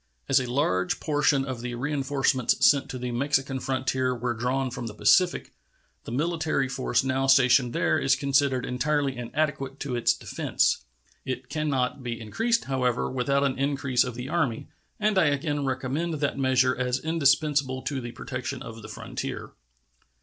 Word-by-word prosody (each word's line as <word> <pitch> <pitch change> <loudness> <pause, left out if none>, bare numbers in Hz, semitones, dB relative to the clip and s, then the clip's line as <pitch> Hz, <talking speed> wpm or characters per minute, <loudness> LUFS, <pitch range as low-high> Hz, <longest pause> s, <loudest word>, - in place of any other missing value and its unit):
As 135 - +4
a 125 -1 -4
large 95 -9 +1
portion 145 -3 +2
of 130 -3 -5
the 120 0 -4
reenforcements 135 -1 +1
sent 140 -2 +3
to 130 - -5
the 125 0 -4
Mexican 135 +1 0
frontier 130 -1 -1
were 120 0 -2
drawn 125 +3 -1
from 120 -1 -5
the 105 - -8
Pacific, 180 - +3 0.5
the - - -7
military 155 0 0
force 130 -2 0
now 135 0 0
stationed 130 -2 +5
there - - +1
is 135 0 +3
considered 135 -2 +1
entirely 140 +1 0
inadequate 135 +2 -2
to 135 -3 -3
its 120 0 +2
defense. 65 - 0 0.4
It 130 0 -5
can 155 -1 -2
not 130 0 -1
be 120 -2 -4
increased, 225 - 0
however, 125 -3 0
without 140 +2 +1
an 135 -2 0
increase 135 -3 +1
of 125 -3 -5
the 125 +1 -6
Army, 135 -7 -1 0.3
and 210 -2 +2
I 170 - +4
again 145 0 0
recommend 135 +6 -2
that 145 -1 -1
measure 130 -1 +2
as 125 0 0
indispensable 140 -3 +1
to 140 -3 -3
the 120 0 -6
protection 125 +1 -5
of 115 0 -9
the - - -10
frontier. - - -6
135 Hz, 165 wpm, -26 LUFS, 125-145 Hz, 0.5 s, stationed